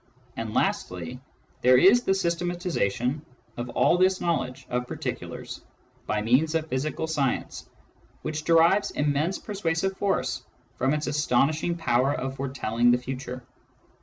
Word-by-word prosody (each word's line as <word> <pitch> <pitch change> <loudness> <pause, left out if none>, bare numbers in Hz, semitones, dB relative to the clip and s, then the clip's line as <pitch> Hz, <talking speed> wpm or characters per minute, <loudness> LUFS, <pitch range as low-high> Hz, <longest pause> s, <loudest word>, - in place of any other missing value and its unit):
And - - -5
lastly, 90 +6 -1 0.4
there 125 0 +6
is 195 - +6
the 190 - +1
systematisation 170 - -1 0.3
of 120 +1 -5
all 170 +8 +3
this 185 0 +3
knowledge 130 -6 -2
of 125 0 -2
particulars - - -6 0.5
by 105 0 0
means 140 +8 +3
of 160 -1 +1
physical 150 +5 -2
science, 145 -5 -2 0.5
which 155 0 -3
derives 170 +5 +4
immense 150 +5 0
persuasive 190 -2 -2
force 130 -11 -1 0.4
from 135 +4 +2
its 150 - -2
astonishing 150 +4 +1
power 135 -3 +2
of 135 +1 -4
foretelling 120 -3 0
the 120 - +5
future. 125 0 -6
145 Hz, 130 wpm, -26 LUFS, 125-170 Hz, 0.5 s, there